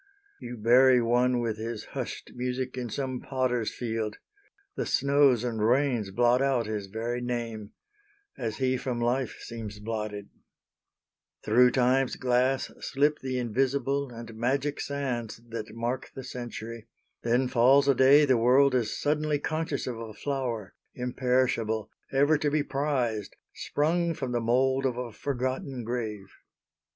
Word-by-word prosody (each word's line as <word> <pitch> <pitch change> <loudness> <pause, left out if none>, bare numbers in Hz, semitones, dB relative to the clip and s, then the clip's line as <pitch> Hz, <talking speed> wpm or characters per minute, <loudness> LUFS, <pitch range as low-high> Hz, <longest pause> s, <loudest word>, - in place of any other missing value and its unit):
You 125 -1 -7
bury 125 +3 +6
one, 120 +1 +2
With 115 -2 -2
his 110 0 -5
hushed - - -5
music, 125 +1 -3
in 125 -2 -4
some 130 +1 -3
Potter's 125 -4 -1
Field; 110 -3 -3 0.6
The - - -2
snows 140 -3 +3
and 115 -3 -2
rains 120 -3 +2
blot 120 +5 +3
out 135 -4 +2
his 105 -2 -4
very 115 +4 -3
name, 115 -3 -4 0.6
As 115 -4 -4
he 130 -1 +1
from 125 -1 -3
life 120 +1 0
seems 110 -3 -7
blotted: 105 -2 -4 1.2
through 125 +4 +6
Time's 130 +1 +2
glass 130 +1 +1
Slip 145 +2 +1
the 130 -1 -3
invisible 135 +3 0
and 115 -1 -9
magic 135 +6 -1
sands 125 -6 -3
That 110 -1 -6
mark 120 +3 -3
the 135 - -6
century, 115 -2 -7 0.3
then 120 +2 +2
falls 130 +3 +5
a 140 - +6
day 135 +3 +6
The 130 -3 +3
world 130 +4 +5
is 120 -4 0
suddenly 150 0 +1
conscious 155 -1 -2
of 120 -3 -4
a 110 -2 -8
flower, 120 -5 -3 0.2
Imperishable, 125 -3 0 0.2
ever 145 +3 +3
to 150 - +1
be 150 0 +1
prized, 130 -8 -1 0.2
Sprung 165 +3 0
from 130 -6 -4
the 120 -1 0
mould 130 +3 +2
of 125 -2 -3
a 125 -2 -4
forgotten 130 -1 -3
grave. 110 -4 -3
125 Hz, 140 wpm, -28 LUFS, 115-135 Hz, 1.2 s, bury